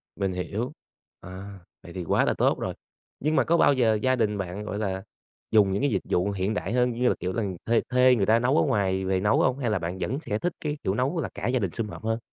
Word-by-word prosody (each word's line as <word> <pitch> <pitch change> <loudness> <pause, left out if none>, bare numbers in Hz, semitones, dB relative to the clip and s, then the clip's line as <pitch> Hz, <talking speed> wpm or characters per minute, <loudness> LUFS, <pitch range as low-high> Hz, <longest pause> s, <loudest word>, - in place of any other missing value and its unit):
Mình 95 -2 -1
hiểu. 105 +8 -3 0.5
À, 95 +2 -9 0.2
vậy 85 - -11
thì 90 - -4
quá - - +2
là - - +2
tốt - - +2
rồi! - - -3 0.5
Nhưng 155 +3 0
mà - - +4
có 170 - +2
bao 145 - +5
giờ 120 -4 +3
gia 130 +2 +3
đình 105 -4 0
bạn, 95 +1 -4
gọi 105 - -4
là, 95 -3 -2 0.5
dùng 105 -3 +5
những 100 - -1
cái 145 - +2
dịch 95 - 0
vụ 90 +3 +1
hiện 100 +2 -1
đại 105 - -3
hơn, 125 0 +2
như 125 +1 0
là, - - +1
kiểu 90 +1 -2
là, 115 - -1 0.2
thuê 115 0 +3
thuê 125 0 +5
người 100 -5 +1
ta 110 +3 +4
nấu 130 +5 +2
ở - - +4
ngoài 95 -8 0
về 95 0 +1
nấu 105 +3 +2
hông? 130 0 +2
Hay 125 -4 0
là 105 - +1
bạn 85 +2 -4
vẫn 130 +8 -2
sẽ 105 -8 -2
thích 175 +5 -1
cái 150 -1 -2
kiểu 95 - 0
nấu 135 - 0
là - - -3
cả - - -4
gia 125 +1 +1
đình 95 -6 -1
sum 110 +6 -3
họp - - -9
hơn? 115 +1 -1
110 Hz, 275 wpm, -26 LUFS, 95-125 Hz, 0.5 s, bao